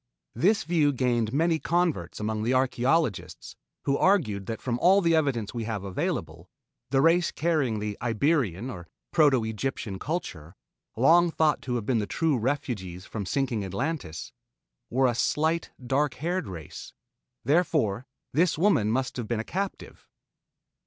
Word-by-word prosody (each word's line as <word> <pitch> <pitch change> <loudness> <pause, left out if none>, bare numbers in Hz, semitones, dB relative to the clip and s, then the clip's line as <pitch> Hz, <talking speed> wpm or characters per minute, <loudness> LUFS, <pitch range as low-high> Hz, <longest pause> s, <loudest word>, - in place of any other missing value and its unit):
This 205 +4 +2
view 160 -3 +2
gained 120 -4 0
many 160 +4 +2
converts 170 - -1
among 110 0 -2
the 120 +4 +1
archaeologists 130 - 0 0.3
who 140 0 +1
argued 110 - +2
that 115 - -4
from 120 -2 -2
all 190 +6 +5
the 170 -3 +3
evidence 130 -9 0
we 115 -2 -3
have 105 -3 -3
available, 95 -2 -3 0.4
the 135 -1 +3
race 165 +2 +4
carrying 150 -9 0
the 105 -1 -4
Iberian 120 - 0
or 90 -5 -9 0.2
Proto 145 -7 +4
Egyptian 110 -3 -4
culture, 90 - -5 0.4
long 170 +8 +5
thought 160 -2 +1
to 125 -2 -3
have 115 -4 -2
been 120 -2 +1
the 105 - -2
true 160 -3 +1
refugees 105 -8 -3
from 100 -4 -5
sinking 130 -5 -1
Atlantis, 100 - -4 0.6
were 130 +2 +2
a 125 - +3
slight 160 +7 0 0.2
dark 140 +3 +1
haired 175 - -2
race. 85 -6 -9 0.5
Therefore 135 - +1 0.3
this 165 +4 +2
woman 160 - +3
must 130 +3 -1
have 120 -3 -4
been 115 -1 -1
a - - -2
captive. 195 +9 -5
130 Hz, 150 wpm, -27 LUFS, 110-160 Hz, 0.6 s, all